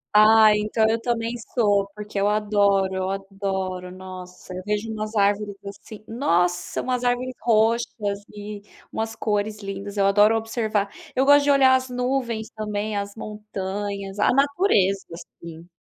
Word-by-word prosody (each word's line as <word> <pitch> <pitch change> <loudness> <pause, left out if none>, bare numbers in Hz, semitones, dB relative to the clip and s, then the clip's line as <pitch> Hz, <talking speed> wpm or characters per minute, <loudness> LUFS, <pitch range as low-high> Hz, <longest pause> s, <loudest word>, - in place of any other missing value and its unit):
Ai 215 0 +7
então 215 +1 +1
eu 225 +1 0
também 230 -1 -1 0.2
sou 205 -4 +3
porque 210 -1 -5
eu 200 - +3
adoro, 205 -2 +2
eu 190 0 -2
adoro, 195 -2 -4
nossa, 185 0 -10
eu 185 - -5
vejo 210 +2 -2
umas 215 0 -5
árvores 205 0 +1
assim, 205 +2 -10
nossa, 180 -8 0
umas 250 -1 -1
árvores 245 +1 0
roxas 220 -2 +1
e 205 0 -8 0.3
umas 225 0 -3
cores 210 -1 -1
lindas, 200 +1 -6
eu 200 - +3
adoro 205 +3 +5
observar, 220 -2 -1 0.3
eu 265 +1 +2
gosto 285 0 +6
de 285 - +4
olhar 265 -2 +5
as 260 0 +1
nuvens 250 -3 -2
também, 210 0 -3
as 200 0 -4
montanhas, 200 -2 -5
a - - +4
natureza, 275 - +2
assim. 170 -1 -11
210 Hz, 150 wpm, -23 LUFS, 195-225 Hz, 0.3 s, Ai